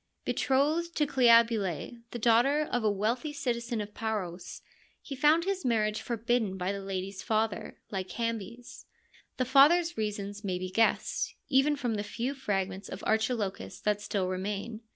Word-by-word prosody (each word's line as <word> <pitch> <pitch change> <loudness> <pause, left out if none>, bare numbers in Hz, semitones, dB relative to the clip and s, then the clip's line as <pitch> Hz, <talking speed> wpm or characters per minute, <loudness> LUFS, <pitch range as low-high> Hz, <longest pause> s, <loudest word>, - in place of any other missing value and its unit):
Be - - 0
trothed 310 +6 +1
to 300 - +2
Cleobule, 230 - +3
the 240 - -5
daughter 240 +6 +3
of 245 -2 0
a 215 - +3
wealthy 225 +9 -1
citizen 235 -4 -2
of 205 0 -7
Paros, 195 -6 -4 0.4
he 275 - -7
found 305 +5 +4
his 390 -2 -1
marriage 215 -4 +1
forbidden 230 -4 -1
by 185 +1 -1
the 200 0 -4
lady's 195 0 -4
father, 220 -2 -1
Lycambes. 230 +3 -4 0.5
The 255 - +1
father's 300 +5 +5
reasons 205 -1 -3
may 185 -3 -1
be 185 0 -5
guessed, 225 +3 +1
even 270 +3 +4
from 245 -4 -2
the 205 -1 -2
few 235 +5 -3
fragments 195 -7 -3
of - - -7
Archilochus 220 -2 -1
that 210 -1 0
still 200 -2 -1
remain. 200 +4 -4
225 Hz, 155 wpm, -29 LUFS, 200-255 Hz, 0.5 s, father's